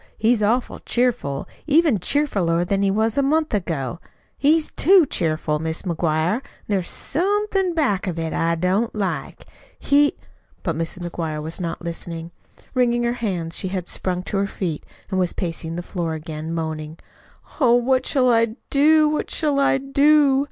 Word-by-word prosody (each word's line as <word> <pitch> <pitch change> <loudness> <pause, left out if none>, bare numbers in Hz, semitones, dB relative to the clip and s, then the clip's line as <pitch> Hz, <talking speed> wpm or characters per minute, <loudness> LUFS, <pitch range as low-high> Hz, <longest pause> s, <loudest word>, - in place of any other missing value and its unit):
He's 225 0 +2
awful 235 +5 0
cheerful, 240 - -1 0.2
even 300 - +4
cheerfuler 180 - +1
than 195 +1 +1
he 200 - +2
was 220 +5 +1
a - - +5
month 305 +2 +1
ago. 170 -5 -2 0.4
He's 305 +3 +2
too 365 0 +5
cheerful, 155 - -1
Mis' 160 +1 -3
McGuire. 170 +4 0 0.3
There's 195 -4 -1
somethin' 390 +1 0
back 210 - +1
of 175 -2 -3
it 165 -1 -2
I 165 0 +1
don't 185 +8 0
like. 200 -3 -3 0.3
He 290 +1 +3 0.2
" - - -36
But 165 - -1
Mrs. 165 +2 -4
McGuire 160 -3 -4
was 160 +4 -4
not 170 0 -4
listening. 170 0 -6 0.4
Wringing 240 -2 +2
her 235 0 +1
hands 180 -9 -3
she 190 - -2
had 185 -2 -3
sprung 180 -1 -2
to 200 - -3
her 200 0 +1
feet 175 -6 -4 0.3
and 190 - 0
was 180 -2 +1
pacing 165 -2 -4
the 175 - -4
floor 170 -3 -3
again, 155 0 -6
moaning: 160 -1 -4 0.6
"Oh, 245 -5 +5
what 255 +2 +2
shall 255 -3 +3
I 230 -1 +2 0.2
do, 305 +2 +5
what 300 0 -1
shall 295 -3 +1
I 275 -1 +3
do?" 280 0 +4
200 Hz, 165 wpm, -22 LUFS, 165-270 Hz, 0.6 s, a